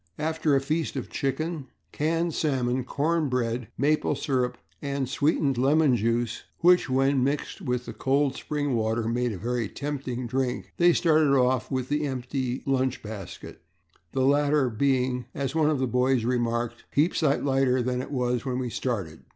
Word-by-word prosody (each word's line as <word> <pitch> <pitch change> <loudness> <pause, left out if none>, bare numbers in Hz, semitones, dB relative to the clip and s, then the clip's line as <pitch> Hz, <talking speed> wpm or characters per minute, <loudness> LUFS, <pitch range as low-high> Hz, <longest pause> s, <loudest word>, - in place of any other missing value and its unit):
After 155 -1 +1
a 135 - +3
feast 155 +3 -2
of 130 - -5
chicken, 155 +1 -2 0.2
canned 165 +2 0
salmon, 130 -5 0
cornbread, 125 -6 -1
maple 150 +2 +2
syrup, 125 -3 -1 0.2
and 140 -2 -2
sweetened 140 -1 +1
lemon 140 0 +4
juice, 115 +1 0 0.2
which, 180 -3 +5
when 135 0 +2
mixed 145 +7 -2
with 125 -6 -2
cold 135 0 +2
spring 145 -2 -2
water 110 0 0
made 120 +1 0
a 100 - -5
very 120 +1 -2
tempting 135 -4 -4
drink, 120 -6 -2
they 175 0 +6
started 155 -5 +3
off 125 -2 +2
with 130 -2 -2
the 150 0 0
empty 130 -1 -3
lunch 130 -2 0
basket, 105 -3 -8 0.5
the 130 - +1
latter 145 -1 +3
being, 125 +1 +1
as 135 -1 -2
one 155 -2 +3
of 155 - +1
the 130 - 0
boys 125 0 +2
remarked, 120 -1 -1
"a - - -30
heap 155 +5 +3
sight 145 -4 +1
lighter 135 -2 +2
than 125 0 -1
it - - -7
was 125 -3 -1
when 130 -2 -2
we 125 -2 -3
started." 100 -13 -3
130 Hz, 165 wpm, -26 LUFS, 125-145 Hz, 0.5 s, they